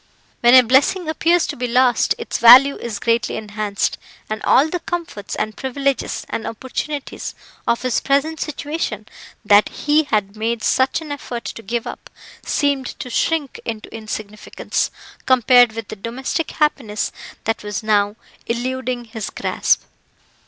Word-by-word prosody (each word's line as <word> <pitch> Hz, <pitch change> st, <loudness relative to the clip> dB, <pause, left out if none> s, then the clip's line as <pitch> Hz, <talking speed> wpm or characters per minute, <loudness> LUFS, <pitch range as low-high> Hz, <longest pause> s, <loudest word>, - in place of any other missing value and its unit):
When 240 Hz, +1 st, +6 dB
a 255 Hz, -, +9 dB
blessing 275 Hz, +9 st, +3 dB
appears 330 Hz, +2 st, +2 dB
to -, -, -4 dB
be 245 Hz, 0 st, -2 dB
lost 245 Hz, 0 st, +3 dB
its -, -, -4 dB
value 255 Hz, +5 st, +9 dB
is 230 Hz, -3 st, -5 dB
greatly 230 Hz, +2 st, 0 dB
enhanced, 210 Hz, -1 st, -2 dB, 0.3 s
and 215 Hz, -, -3 dB
all 275 Hz, +4 st, +4 dB
the 355 Hz, +3 st, -3 dB
comforts, 335 Hz, -, -5 dB
and 215 Hz, 0 st, -3 dB
privileges, 275 Hz, 0 st, -2 dB
and 225 Hz, -, -3 dB
opportunities, 265 Hz, +5 st, -5 dB, 0.3 s
of 235 Hz, +1 st, +1 dB
his 255 Hz, -2 st, +1 dB
present 285 Hz, +4 st, 0 dB
situation, 290 Hz, -8 st, -4 dB, 0.4 s
that 205 Hz, 0 st, +5 dB
he 300 Hz, +1 st, +1 dB
had 210 Hz, -5 st, -1 dB
made 225 Hz, +1 st, -2 dB
such 260 Hz, +4 st, +2 dB
an 310 Hz, -2 st, -8 dB
effort 245 Hz, -4 st, -6 dB
to -, -, -6 dB
give 235 Hz, +2 st, -3 dB
up, -, -, -8 dB, 0.3 s
seemed 280 Hz, -3 st, 0 dB
to 250 Hz, -, -6 dB
shrink 305 Hz, +1 st, 0 dB
into 225 Hz, -2 st, -6 dB
insignificance, 215 Hz, -1 st, -4 dB, 0.4 s
compared 245 Hz, -2 st, +5 dB
with 225 Hz, -2 st, -6 dB
the -, -, -5 dB
domestic 245 Hz, +9 st, -3 dB
happiness 255 Hz, -9 st, -1 dB, 0.3 s
that 225 Hz, +1 st, -1 dB
was 210 Hz, +1 st, -4 dB
now 205 Hz, -1 st, +2 dB, 0.3 s
eluding 250 Hz, +1 st, -2 dB
his 220 Hz, -2 st, -6 dB
grasp. -, -, 0 dB
240 Hz, 145 wpm, -20 LUFS, 220-275 Hz, 0.4 s, a